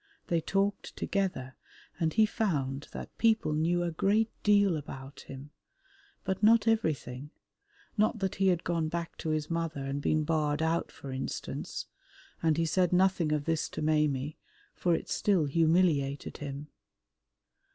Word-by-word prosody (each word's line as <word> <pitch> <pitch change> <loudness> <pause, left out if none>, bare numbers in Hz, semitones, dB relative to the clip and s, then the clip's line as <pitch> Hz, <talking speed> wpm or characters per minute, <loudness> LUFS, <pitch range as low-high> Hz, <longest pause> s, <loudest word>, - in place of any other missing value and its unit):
They 170 -1 +2
talked 195 +4 -1
together 180 -10 -2 0.4
and 160 -2 +1
he 220 0 +5
found 145 -11 -1
that - - -8
people 220 -8 +3
knew 170 +3 +1
a 170 - -1
great 210 +7 +2
deal 200 -3 +4
about 135 -2 -8
him, 135 +2 -9 0.7
but 190 0 -2
not 220 +1 +5
everything, 150 - 0 0.7
not 215 +1 +2
that 195 -3 -1
he 195 - +5
had 175 -2 +2
gone 165 -2 0
back 170 0 -4
to 160 - -4
his 155 +1 -1
mother 165 -4 -2
and 140 +1 -3
been 155 +1 +1
barred 150 -1 0
out, 165 +1 0
for 135 - -9
instance, 130 0 -4 0.6
and 160 -2 +2
he 165 - +2
said 180 +1 +2
nothing 180 -3 +3
of 150 -1 0
this 165 -1 0
to - - -5
Maimie, 150 -2 +1 0.4
for 175 -2 +1
it - - -4
still 190 -7 +2
humiliated 155 -2 +2
him. 145 +1 -6
160 Hz, 150 wpm, -30 LUFS, 145-190 Hz, 0.7 s, he